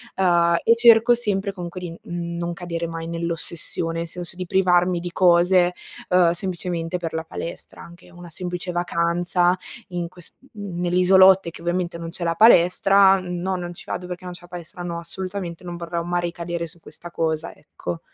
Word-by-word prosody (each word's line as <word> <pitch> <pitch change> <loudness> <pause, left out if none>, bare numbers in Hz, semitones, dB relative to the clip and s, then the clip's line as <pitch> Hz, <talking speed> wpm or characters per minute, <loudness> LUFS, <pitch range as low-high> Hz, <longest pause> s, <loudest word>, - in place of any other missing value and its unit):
ehm, 170 -2 +3
e 230 - +5
cerco 235 0 +6
sempre 205 -4 -1
comunque 180 -1 -7
di, 180 -2 -6
mhmm, 170 0 -5
non 170 0 -3
cadere 170 -1 -4
mai 165 0 -6
nell'ossessione, 170 0 -3 0.6
nel 170 - -3
senso 175 -1 -7
di 185 0 -5
privarmi 180 -1 +2
di 175 0 -6
cose, 180 0 +4 0.4
ehm, 180 -2 +5
semplicemente 175 -1 -3
per 165 -2 -5
la 160 0 -2
palestra. 165 +1 -8
Anche 175 +1 -14
una 175 0 -12
semplice 180 +1 -5
vacanza, 175 +1 +1 0.3
in 175 -2 -3
ques 180 -1 -11 0.2
n 200 -5 -6
nell'isolotto 185 +1 +5
e - - -3
che 165 - -12
ovviamente 175 0 -2
non 165 0 -6
c'è 175 0 -7
la 165 0 0
palestra, 195 -1 +6
"no 180 +1 -3
non 175 -1 -5
ci - - -12
vado 180 - -4
perché 180 0 -7
non 180 - -6
c'è 175 - -13
la 175 - -14
palestra," 175 0 -9
no, 170 -1 -4
assolutamente 185 0 -6
non 175 -1 -6
vorrò 170 0 -4
mai 175 +1 -1
ricadere 170 0 -4
su 170 +2 -12
questa 175 - -11
cosa, 160 -1 -2
ecco. 85 -1 -7
175 Hz, 185 wpm, -22 LUFS, 170-185 Hz, 0.6 s, cerco